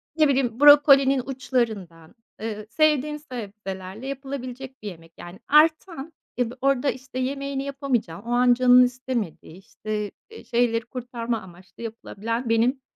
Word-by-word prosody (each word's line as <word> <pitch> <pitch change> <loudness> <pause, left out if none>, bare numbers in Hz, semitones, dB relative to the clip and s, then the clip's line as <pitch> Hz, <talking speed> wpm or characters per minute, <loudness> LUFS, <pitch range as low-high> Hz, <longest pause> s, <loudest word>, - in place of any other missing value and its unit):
ne 310 -2 +4
bileyim 260 -3 0
brokolinin 275 -2 +7
uçlarından, 225 -10 -3 0.3
eee, 215 -1 -5
sevdiğim 300 +2 +1
sebzelerle 210 -4 -8
yapılabilecek 265 -1 -7
bir - - -5
yemek 165 -3 -10
yani 175 +2 -11
artan 315 0 +2 0.3
e 240 -1 0
bi - - -10
orada, 275 0 +2
işte, 260 0 -8
yemeğini 275 +1 -3
yapamayacağın 270 - -2
o 235 +2 -7
an 245 0 +4
canın 250 0 +6
istemediği, 245 -9 -4
işte, 210 +1 -5 0.2
eee, 450 - -12
şeyleri 235 -1 0
kurtarma 235 -2 -4
amaçlı 185 +5 -14
yapılabilen 230 +1 -5
benim 245 +4 +2
250 Hz, 135 wpm, -24 LUFS, 220-275 Hz, 0.3 s, brokolinin